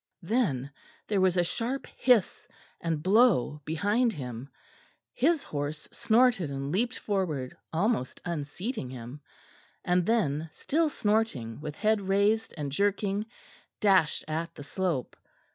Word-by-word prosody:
Then 160 - 0 0.4
there 200 -3 +1
was 185 -1 +3
a 175 - +4
sharp 235 +9 -3
hiss 245 -7 +2 0.3
and 160 -3 -2
blow 190 - +4
behind 205 +9 +1
him; 125 - -6 0.6
his 340 - +2
horse 145 +1 -4
snorted 225 - +3
and 140 0 -4
leapt 235 +8 0
forward, 165 -11 -2 0.2
almost 165 - 0
unseating 170 - -4
him, 125 +3 -8 0.6
and 180 0 +3
then, 165 -8 +1
still 320 - 0
snorting 205 - 0
with 150 -1 -5
head 215 +2 +2
raised 200 +3 +2
and 145 -2 -3
jerking, 200 +4 0 0.5
dashed 190 -7 +3
at 165 +2 -3
the 145 - -8
slope. 170 -4 -2
180 Hz, 125 wpm, -29 LUFS, 150-220 Hz, 0.6 s, a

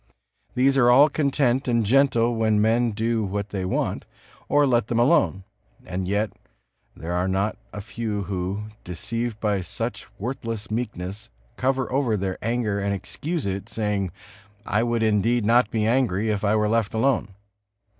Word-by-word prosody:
These 135 +2 +3
are 120 -2 +5
all 140 +5 +7
content 140 -3 +1
and 115 -2 +2
gentle 120 -1 +3
when 110 -2 +2
men 115 +3 +3
do 110 +1 -1
what 100 +1 -3
they 95 -2 -3
want, 90 - -1 0.5
or 145 0 +4
let 120 -4 +2
them 115 - -1
alone; 95 - +3 0.4
and 90 0 -3
yet 100 +1 0 0.6
there 80 +4 -6
are 90 +1 0
not 95 +3 0 0.2
a 105 - -6
few 105 -1 -3
who, 95 +2 -3 0.2
deceived 115 +6 -4
by 105 -3 0
such 90 - -4
worthless 115 -2 -5
meekness, 105 -3 -4 0.3
cover 130 0 0
over 130 -6 +1
their 95 -1 -3
anger 115 -3 -1
and 100 0 -1
excuse 155 - -3
it, 95 0 -3
saying: 105 -4 -1 0.5
"I 105 - +1
would 120 -1 0
indeed 110 +2 +2
not 115 0 +4
be 110 -1 0
angry, 110 -3 +1
if 105 -1 -2
I 105 +1 +3
were 105 -1 +2
left 110 -1 0
alone." 110 -4 +1
110 Hz, 160 wpm, -24 LUFS, 100-120 Hz, 0.6 s, all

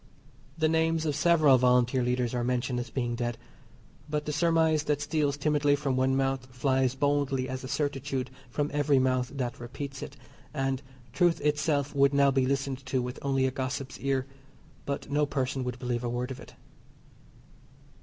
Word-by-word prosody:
The 160 0 +3
names 160 0 +1
of 150 -2 0
several 155 -4 +5
Volunteer 125 +1 +3
Leaders 125 0 0
are 120 -1 0
mentioned 125 0 -1
as 120 - -5
being 120 -3 -2
dead. 120 -1 -2 0.7
But 150 0 -2
the 150 - -2
surmise 160 -2 +2
that 150 -1 +1
steals 145 -2 0
timidly 145 -1 +2
from 140 -2 -1
one 130 +1 +2
mouth 135 -1 0
flies 130 0 +1
boldly 140 -2 +1
as 130 0 -5
a - - -5
certitude 140 -2 -2 0.2
from 145 +4 -1
every 145 -1 +3
mouth 130 -1 +1
that 125 -3 -3
repeats 135 +3 -6
it, - - -8 0.4
and 135 -1 -1 0.3
truth 170 +4 +3
itself 150 -1 +1
would 140 0 +3
now 140 -1 +5
be 130 -1 +2
listened 135 0 -1
to 130 -1 0
with 125 0 -4
only 135 -1 +1
a 130 - +1
gossip's 130 0 -4
ear, 135 -1 0 0.6
but 140 0 -3
no 145 0 +2
person 135 -1 -1
would 125 -1 -4
believe 125 -1 -2
a 120 - -1
word 125 +2 -3
of 130 - -6
it. - - -13
135 Hz, 175 wpm, -28 LUFS, 130-145 Hz, 0.7 s, several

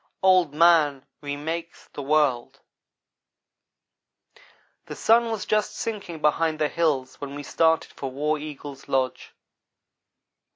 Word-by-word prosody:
OLD 185 -5 +5
MAN 150 -4 +4 0.2
REMAKES 160 +4 -5
THE - - -6
WORLD 140 -4 +1 2.3
THE - - -7
sun 230 +1 +3
was 220 -4 -3
just 215 -1 0
sinking 195 -8 -5
behind 155 +1 +1
the 150 -1 0
hills 145 -7 -1
when 140 0 -6
we 145 - -6
started 160 +2 +1
for 135 - -5
War 150 +3 -1
Eagle's 145 -2 -9
lodge. 130 -1 -2
155 Hz, 115 wpm, -25 LUFS, 145-170 Hz, 2.3 s, OLD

